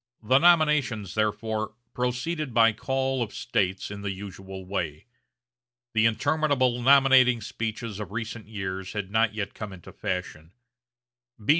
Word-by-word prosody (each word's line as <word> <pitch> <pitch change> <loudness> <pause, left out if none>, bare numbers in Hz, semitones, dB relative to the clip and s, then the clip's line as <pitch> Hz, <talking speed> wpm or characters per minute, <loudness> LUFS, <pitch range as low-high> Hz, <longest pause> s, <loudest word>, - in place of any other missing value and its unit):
The 130 +5 +4
nominations, 150 - +3
therefore, 110 0 -1 0.2
proceeded 125 +3 -2
by 115 -1 +6
call 130 +2 -1
of 110 -3 -3
States 95 -5 -1
in 100 0 -6
the 100 - -3
usual 95 -1 -8
way. 90 -2 -3 0.9
The 110 0 +4
interminable 130 +1 +1
nominating 130 -2 +6
speeches 110 -2 -4
of 105 -2 -6
recent 110 0 -5
years 95 -3 -5
had 100 -2 -4
not 110 -1 +2
yet 100 -2 -3
come 105 -2 -7
into 90 -3 -12
fashion. 90 -2 -5
110 Hz, 130 wpm, -26 LUFS, 100-125 Hz, 0.9 s, by